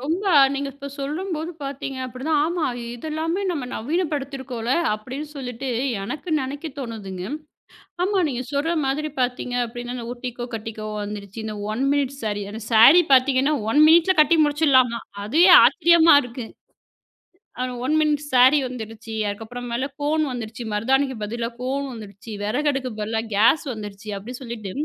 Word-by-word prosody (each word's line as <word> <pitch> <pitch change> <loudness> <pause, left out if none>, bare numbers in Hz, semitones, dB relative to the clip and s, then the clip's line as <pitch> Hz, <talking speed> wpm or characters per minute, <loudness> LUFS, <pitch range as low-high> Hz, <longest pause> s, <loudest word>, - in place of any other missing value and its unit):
ரொம்ப 325 +9 -2 0.2
அ - - +8
நீங்கள் 275 0 -3
இப்போ 280 0 -8
சொல்லும்போது 320 +3 -3
பார்த்தீங்க 275 -1 -5
அப்படித்தான் 280 +5 -1
ஆமா 340 -1 -1 0.3
இதெல்லாமே 320 +8 -3
நம்ம 300 -7 -3
நவீனப்படுத்தியிருக்கோம் 275 -4 -3
ல 255 - +2 0.2
அப்படின்னு 260 +8 -7
சொல்லிட்டு, 255 0 -5 0.3
எனக்கு 290 - -6
நினைக்க 280 +4 -5
தோணுதுங்க. 210 -8 -6 0.8
ஆமா, 395 0 +1
நீங்க 255 -2 -3
சொல்கிற 300 +4 0
மாதிரி 305 +3 -1
பார்த்தீங்க 250 0 -1
அப்டின்னா 240 +1 -6
இந்த 235 -1 -6
ஒட்டிக்கோ, 245 -1 -6
கட்டிக்கோ 215 -1 -6 0.2
வந்துருச்சு. 205 0 -7
இந்த 215 -1 -5 0.2
ஒன் 260 +4 -1
மினிட் 280 -1 0
ஸேரி 205 -2 -2
அந்த 220 0 -7
ஸேரி 270 +11 +8
பார்த்தீங்கன்னா 265 +3 +4 0.2
ஒன் 295 - +4
மினிட் 335 +3 +5
ல - - -11
கட்டி 325 +3 +2
முடிச்சிடலாமா, 265 -6 +3 0.2
அதுவே 325 - +4 0.2
ஆச்சரியமா 340 -2 +6
இருக்கு. 245 -1 -7 1.1
அந்த 255 0 -2
ஒன் 305 +4 +1
மினிட் 300 -1 +1
ஸேரி 260 +4 +6
வந்துவிட்டது. 225 -2 -8
அதுக்கு 205 +2 -5
அப்புறம் 245 +1 -7
மேலாக 265 +3 -2
கோன் 310 +2 +1
வந்துவிட்டது. 230 0 -6
மருதாணிக்கு 265 +4 +1
பதிலாக 235 +2 -4
கோன் 275 +2 -2
வந்துவிட்டது. 210 0 -9
விறகடுப்புக்கு 270 +3 -1
பதிலாக 220 +1 -2
கேஸ் 230 +9 +4
வந்துவிட்டது. 210 -1 -7
அப்படி 225 +6 -9
சொல்லிட்டு, 225 -5 -6
255 Hz, 150 wpm, -23 LUFS, 225-295 Hz, 1.1 s, அ